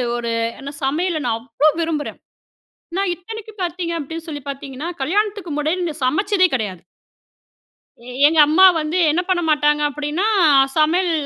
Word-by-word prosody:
ஒரு 235 -1 -3 0.3
ஏன்னா 280 +1 -7
சமையல 320 +4 0
நான் 230 -2 +1
அவ்ளோ 255 +5 0
விரும்புறேன். 315 -3 -3 0.8
நான் 390 -2 0
இத்தனைக்கும் 435 +2 -10
பார்த்தீங்க 345 0 -3
அப்படின்னு 325 +3 -7
சொல்லி 290 -3 -6
பார்த்திங்கன்னா, 275 +3 -6
கல்யாணத்துக்கு 405 +3 -1
முன்னாடி 325 +2 -1
சமச்சதே 375 +7 +2
கெடையாது. 200 -7 -3 1.5
எங்க 320 +1 +2
அம்மா 345 +6 +6 0.2
வந்து 305 +4 -2
என்ன 345 +4 +1
பண்ண 355 -1 +2
மாட்டாங்க 295 0 +2
அப்படின்னா, 300 +7 -2 0.5
சமையல் 340 +4 +2
320 Hz, 130 wpm, -20 LUFS, 290-365 Hz, 1.5 s, அம்மா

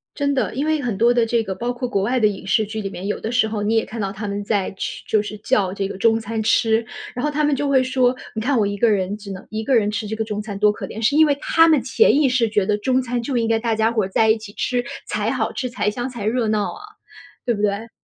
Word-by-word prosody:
真 285 -1 0
的， 265 - -1
因 280 +4 -1
为 310 -1 +1
很 235 -7 -2
多 235 +2 +4
的 240 -1 +3
这 230 0 +1
个 190 -3 -4
包 240 +4 -2
括 245 0 -4
国 200 -4 0
外 250 +5 +1
的 215 - +4
影 200 -2 -5
视 215 +3 +2
剧 215 +1 -5
里 195 - -4
面， 195 0 -6
有 205 - -2
的 225 - -4
时 240 -2 +3
候 215 -1 -3
你 215 +2 +1
也 225 - +2
看 225 0 -6
到 195 -1 -2
他 210 +1 -6
们 200 0 -3
在 200 -2 -1
吃 190 - -5
就 215 - +2
是 210 0 -7
叫 205 -5 +1
这 195 -1 -2
个 195 - -7
中 225 +1 +3
餐 225 0 -3
吃。 225 +1 +2 0.3
然 250 - -3
后 300 - +1
他 300 +1 0
们 295 -1 +2
就 285 +1 -1
会 265 -2 +4
说： 255 -1 +2 0.2
“你 220 - -2
看 260 +3 +1
我 215 - +3
1 205 - -3
个 225 +3 +3
人 200 -1 0
只 200 -1 -9
能 190 -1 -8
1 220 0 -4
个 260 +3 +2
人 210 -3 +3
吃 215 0 -3
这 220 - -3
个 220 - -1
中 210 -1 -3
餐， 205 -2 -6
多 210 0 +5
可 210 - -6
怜。” 220 - -7
是 235 +6 +2
因 315 +1 +7
为 285 -2 +1
他 325 +3 +4
们 310 -5 +4
潜 270 - +3
意 295 - +4
识 245 -3 +2
觉 210 -2 +1
得， 210 +1 +1
中 255 +4 +1
餐 245 -1 -2
就 250 +1 -2
应 230 -1 +1
该 225 -1 +2
大 225 -1 0
家 220 +1 +2
伙 225 -3 +1
儿 - - -2
在 220 +3 +3
一 220 - +4
起 215 -2 -10
吃 245 +2 -1 0.2
才 - - -1
好 - - -1
吃， 255 - -3
才 235 -3 -1
香 240 +4 -4
才 235 -5 -6
热 225 +1 +1
闹 215 -1 0
啊， - - -11 0.6
对 240 -2 +1
不 205 - -4
对？ 210 +2 -1
225 Hz, 325 characters per minute, -21 LUFS, 210-250 Hz, 0.6 s, 因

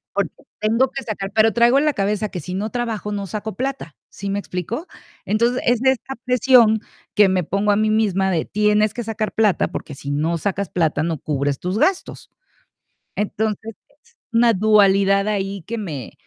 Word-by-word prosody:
Porque - - 0 0.3
tengo 230 +5 +2
que 270 - -5
sacar 200 -4 -5
pero 220 0 +4
traigo 235 +4 +4
en 285 - +3
la 300 - +2
cabeza 205 0 -1
que 180 - -5
si 180 +3 -7
no 205 +3 -3
trabajo 225 -4 -3
no 200 -1 -3
saco 215 +1 -5
plata, 265 - -4
¿sí 200 - -6
me 200 +1 -1
explico? 205 - -5 0.4
Entonces, 235 +4 +1
es 240 -1 +2
de 265 0 +5
esta 265 +1 -5
presión 250 -3 +5 0.4
que 205 -2 +6
me 185 -1 +1
pongo 200 +5 0
a - - +3
mí 215 +1 +1
misma 195 -3 +1
de: 165 -3 0
"Tienes 210 0 +2
que 240 - -4
sacar 220 -1 -3
plata, 215 -4 +2
porque 145 - -6
si 140 +1 -6
no 160 +4 0
sacas 195 +1 -2
plata 160 -3 0
no 165 -2 -2
cubres 140 -1 -2
tus 180 +3 -2
gastos". 375 - -1 0.9
Entonces, 215 +1 -2
es 285 - -31 0.3
una 230 0 +4
dualidad 195 -1 +4
ahí 195 -2 -2
que 230 +1 -3
me 155 - -6
210 Hz, 190 wpm, -21 LUFS, 190-230 Hz, 0.9 s, que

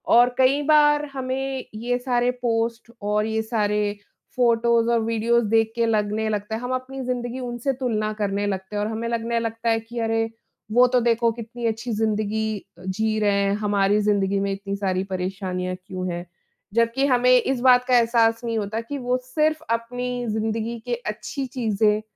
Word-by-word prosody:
और 240 +1 +7
कई 265 +2 +4
बार 295 0 +4
हमें 265 0 -3
ये 240 +3 -1
सारे 245 -1 +1
पोस्ट 230 0 -1
और 210 +1 +1
ये 220 0 0
सारे 210 -2 0 0.4
फ़ोटोज़ 235 -1 +3
और 235 - +3
वीडियोज़ 230 +1 +1
देख 225 0 +3
के 235 -1 +2
लगने 215 -1 0
लगता 210 +1 -2
है, 225 - -5
हम 250 +1 -4
अपनी 260 +1 -6
ज़िंदगी 245 0 -3
उनसे 245 +2 -2
तुलना 225 -5 -1
करने 205 -1 -1
लगते 190 +1 -4
हैं 205 - 0
और - - -1
हमें 225 +1 -3
लगने 235 0 -1
लगता 230 0 -2
है 225 0 +3
कि, 230 +2 -7
"अरे! 225 0 0 0.4
वो 245 +3 +6
तो 250 0 +3
देखो 235 0 +2
कितनी 235 +1 -7
अच्छी 225 +2 -2
ज़िंदगी 215 0 0 0.2
अ, 175 - -15
जी 215 +3 0
रहे 205 -1 +2
हैं। 200 0 +1
हमारी 205 0 +2
ज़िंदगी 200 -1 +1
में 200 0 -1
इतनी 195 0 -4
सारी 190 -2 -1
परेशानियाँ 185 -1 -3
क्यों 185 -1 -4
हैं?" 175 +1 -5 0.5
जबकि 230 +4 +2
हमें 250 -1 +4
इस 265 -2 -1
बात 250 -1 +6
का 250 -1 +5
एहसास 230 0 +3
नहीं 230 -1 -1
होता 215 +2 -2
कि 285 +5 -6
वो 250 -1 0
सिर्फ़ 310 +4 0
अपनी 245 +2 -2
ज़िंदगी 220 +2 -2
के 245 -1 -1
अच्छी 250 +6 -4
चीज़ें 215 -4 +1
230 Hz, 180 wpm, -23 LUFS, 210-245 Hz, 0.5 s, और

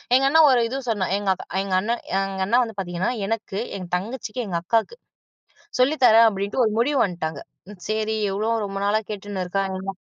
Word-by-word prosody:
எங்கண்ண 275 +4 +4
ஒரு 250 -2 +4
இது 260 +4 -4
சொன்னான், 200 -4 0
எங்கக்கா 195 -2 -1 0.2
எங்கண்ண 195 +3 0 0.3
எங்கண்ணா 195 +4 +1
வந்து 225 -3 -6
பார்த்தீங்கன்னா, 175 +2 -2 0.2
எனக்கு 215 -2 -3 0.2
எங் 180 -2 -8
தங்கச்சிக்கு, 230 +4 -4
எங்கக்காக்கு 200 - -1 0.8
சொல்லி 285 +5 +4
தரேன் 225 -1 +7
அப்படின்ட்டு 200 +4 -1
ஒரு 215 - 0
முடிவு 280 +3 +2
வன்டாங்க. 160 -6 -4 0.5
சேரி 220 0 -1 0.2
எவ்வளோ 215 +4 0
ரொம்ப 195 0 -5
நாளா 210 +2 +2
கேட்டுன்னு 205 -2 -4
இருக்கா. 190 0 -3
205 Hz, 150 wpm, -23 LUFS, 190-230 Hz, 0.8 s, தரேன்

